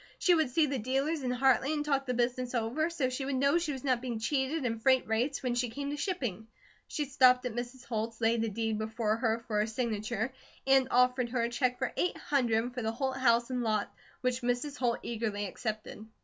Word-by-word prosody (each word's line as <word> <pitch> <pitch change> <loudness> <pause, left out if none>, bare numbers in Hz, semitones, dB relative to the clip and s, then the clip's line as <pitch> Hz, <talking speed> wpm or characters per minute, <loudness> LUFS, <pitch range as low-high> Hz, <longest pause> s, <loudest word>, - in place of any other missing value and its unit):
She 360 - +4
would 315 -5 +2
see 305 +5 +3
the 275 -2 -2
dealers 270 +7 0
in 255 - -2
Hartley 265 +2 +3
and 295 -1 -1
talk 275 -2 0
the 250 - 0
business 245 +1 -1
over, 245 +8 0
so 280 -7 -1
she 255 +2 -3
would 270 0 -2
know 280 +5 +3
she 335 -3 -2
was 265 -3 -6
not 255 -3 +1
being 245 -3 -3
cheated 265 +5 -1
in 230 -2 -1
freight 260 +2 +3
rates 240 +6 0
when 250 -2 0
she 245 0 0
came 280 +4 -4
to - - -2
shipping. 250 - -3 0.4
She 300 - -2
stopped 255 -2 +4
at 245 - -2
Mrs. 245 +2 -6
Holt's, 225 -1 -3
laid 225 0 +2
a 225 - 0
deed 220 +1 -2
before 220 0 -1
her 230 -1 0
for 210 -2 0
her 210 - +1
signature, 225 +1 -2 0.3
and 270 -1 +5
offered 250 0 +3
her 240 -1 0
a 235 - 0
check 250 +1 0
for 260 - -2
eight 360 - 0
hundred 245 -4 0
for 250 - -4
the 220 -1 -1
Holt 265 +2 -2
house 235 -1 +3
and 250 -1 -1
lot, 215 -3 0 0.3
which 250 0 0
Mrs. 245 +4 -1
Holt 240 -2 +1
eagerly 215 -3 -2
accepted. 215 +2 -5
250 Hz, 225 wpm, -31 LUFS, 230-270 Hz, 0.4 s, and